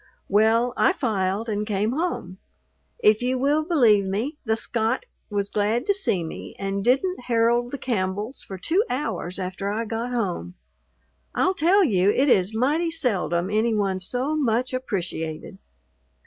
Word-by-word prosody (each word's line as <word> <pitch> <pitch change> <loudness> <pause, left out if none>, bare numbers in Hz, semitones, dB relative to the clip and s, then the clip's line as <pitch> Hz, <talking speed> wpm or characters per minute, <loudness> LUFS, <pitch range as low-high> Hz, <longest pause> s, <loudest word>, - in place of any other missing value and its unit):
Well, 225 +4 +3
I 385 - +4
filed 210 - -1
and 210 -1 -1
came 210 +1 0
home. 265 - -3 0.6
If 215 +1 +5
you 255 +1 0
will 290 +4 +2
believe 240 - +4
me, 230 +11 -3
the 220 -3 +1
Scot 225 - -1 0.2
was 200 -1 -1
glad 215 +4 0
to 405 - +3
see 380 - +1
me 160 - -8
and 195 0 -2
didn't 265 - +1
herald 235 +1 +2
the 280 - -5
Campbells 210 0 -2
for 190 - -8
two 340 - +1
hours 250 - -3
after 190 +1 -4
I 220 +3 -2
got 230 +2 -3
home. 180 - -2 0.8
I'll 370 - +2
tell 380 +3 +4
you, 195 - +3
it 270 +7 +3
is 190 -4 +3
mighty 290 +9 +1
seldom 195 - 0
any 220 +2 +2
one's 190 -3 -1
so 260 +5 -1
much 250 -3 0
appreciated. 180 -8 -4
225 Hz, 155 wpm, -24 LUFS, 195-260 Hz, 0.8 s, If